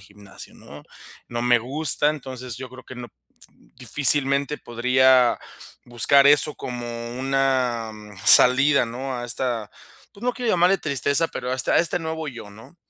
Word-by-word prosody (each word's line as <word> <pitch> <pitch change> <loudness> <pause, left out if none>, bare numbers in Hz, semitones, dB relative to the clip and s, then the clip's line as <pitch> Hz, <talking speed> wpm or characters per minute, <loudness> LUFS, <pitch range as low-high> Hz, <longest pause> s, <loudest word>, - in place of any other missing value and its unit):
gimnasio, 100 +1 -15
¿no?, - - -14 0.5
no 120 0 -4
me 120 0 +3
gusta, 145 +5 -1
entonces 130 -5 -6
yo 130 -1 -9
creo 130 0 -13
que - - -11
no, 120 -1 -9 0.7
difícilmente 140 +3 +1
podría 125 +1 +2 0.5
buscar 130 +4 +3
eso 145 +1 +3
como 120 -2 -7 0.3
una, 130 -4 0
mm, 105 -1 -13
salida, 135 +4 +5
¿no?, 130 +3 -6
a 120 0 -6
esta, 120 -3 -2 0.4
pues, 200 - -17
no 250 - +1
quiero 245 -3 -2
llamarle 180 +2 +3
tristeza, 140 +2 0
pero 125 - -6
a - - 0
esta 130 - -1
a - - +5
este 170 +1 0
nuevo 160 -1 -5
yo, 120 -6 -10
¿no? 110 +11 -16
130 Hz, 160 wpm, -22 LUFS, 120-140 Hz, 0.7 s, salida